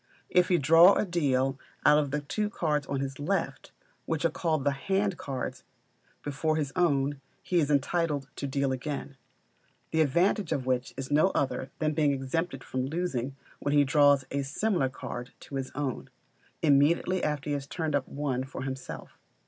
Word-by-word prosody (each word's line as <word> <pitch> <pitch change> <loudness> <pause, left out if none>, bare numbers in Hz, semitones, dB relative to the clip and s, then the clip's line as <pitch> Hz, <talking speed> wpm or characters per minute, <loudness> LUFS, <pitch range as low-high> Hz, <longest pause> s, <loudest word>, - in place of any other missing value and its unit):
If 180 0 +4
he 180 - +3
draw 165 +5 +7
or - - +1
deal 135 -7 +1 0.3
out 150 -1 +5
the 150 +2 -1
two 210 +9 -2
cards 150 -7 -1
on 135 -1 -2
his 135 0 -4
left, 185 +7 -2 0.4
which 160 0 -1
are 165 - +3
called 160 -3 -1
the 145 - +2
hand 195 +7 0
cards, 135 -5 -5 0.6
before 150 +2 -1
his 145 -4 -2
own, 145 -5 +1 0.2
he 180 - +1
is 150 -3 +1
entitled 145 0 +1
to 140 - -3
deal 140 0 0
again; 140 +1 -4 0.8
the 160 - +2
advantage 170 +5 +2
of 130 - -1
which 130 -1 0
is 135 +1 -5
no 150 +5 +5
other 135 -1 -1
than 155 -1 0
being 150 -2 +2
exempted 135 +1 -2
from 130 +1 -3
losing 140 -5 -2 0.2
when 145 - 0
he 145 - +6
draws 145 -1 +4
a 140 - 0
similar 140 +1 0
card 125 -1 -7
to - - -13
his 130 -1 -3
own, 140 -3 -3 0.5
immediately 160 +5 +3
after 150 -1 -1
he - - +1
has 140 -1 -3
turned 160 -2 -3
up 140 -2 0
one 135 -3 -2
for 130 0 -7
himself. 135 -1 -7
145 Hz, 175 wpm, -29 LUFS, 135-160 Hz, 0.8 s, draw